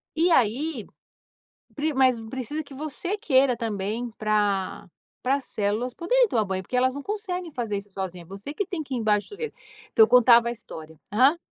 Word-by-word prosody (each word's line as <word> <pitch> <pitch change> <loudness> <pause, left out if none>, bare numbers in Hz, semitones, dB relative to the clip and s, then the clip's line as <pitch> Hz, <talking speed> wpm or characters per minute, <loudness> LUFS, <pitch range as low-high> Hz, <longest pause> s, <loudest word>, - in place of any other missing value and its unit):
E 335 +3 +3
aí, 260 -1 +1 1.1
mas 260 -2 +4
precisa 265 +5 -4
que 280 - -14
você 310 +8 -4
queira 270 - +3
também 225 +1 -3
para 205 -3 0 0.4
para 265 +2 +2
as 280 - -4
células 215 +4 -1
poderem - - +2
tomar 220 -3 +1
banho 190 0 -3
porque 250 - -3
elas 260 +1 +2
não 285 - -6
conseguem 370 -5 -4
fazer 230 -6 -2
isso 200 0 -9
sozinha, 185 -2 -5
você 200 - -8
que 405 - -2
tem 345 -3 -4
que 275 -3 -7
ir - - 0
embaixo 210 -2 +1
do - - -14
chuveiro. 445 +2 -5 0.4
Então 445 - +7
eu - - +5
contava 240 -1 +6
a 235 - 0
história, 160 -8 -10
aham. 270 +10 +4
250 Hz, 185 wpm, -25 LUFS, 210-305 Hz, 1.1 s, Então